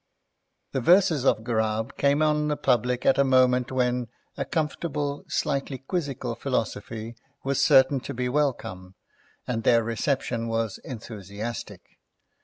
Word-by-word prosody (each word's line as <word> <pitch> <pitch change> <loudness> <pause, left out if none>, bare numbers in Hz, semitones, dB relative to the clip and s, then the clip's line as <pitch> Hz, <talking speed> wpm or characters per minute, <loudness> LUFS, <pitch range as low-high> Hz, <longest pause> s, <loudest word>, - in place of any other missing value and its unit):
The 135 - -1
verses 170 -2 +4
of 110 - +3
Ghurab 110 -1 -1
came 140 +2 +2
on 150 0 +2
the 150 -1 0
public 125 -3 +1
at 135 - +4
a - - +6
moment 130 -2 +3
when 125 -1 0 0.3
a 140 - -2
comfortable, 150 -1 -2
slightly 140 -1 -1
quizzical 140 0 -3
philosophy 115 +1 -3 0.3
was 135 0 +1
certain 130 +1 +5
to - - -7
be 125 +1 -1
welcome, 120 -10 -2 0.5
and 115 -2 -2
their 115 +1 +4
reception 115 0 -1
was 115 -2 -2
enthusiastic. 110 -1 -7
125 Hz, 130 wpm, -26 LUFS, 115-140 Hz, 0.5 s, a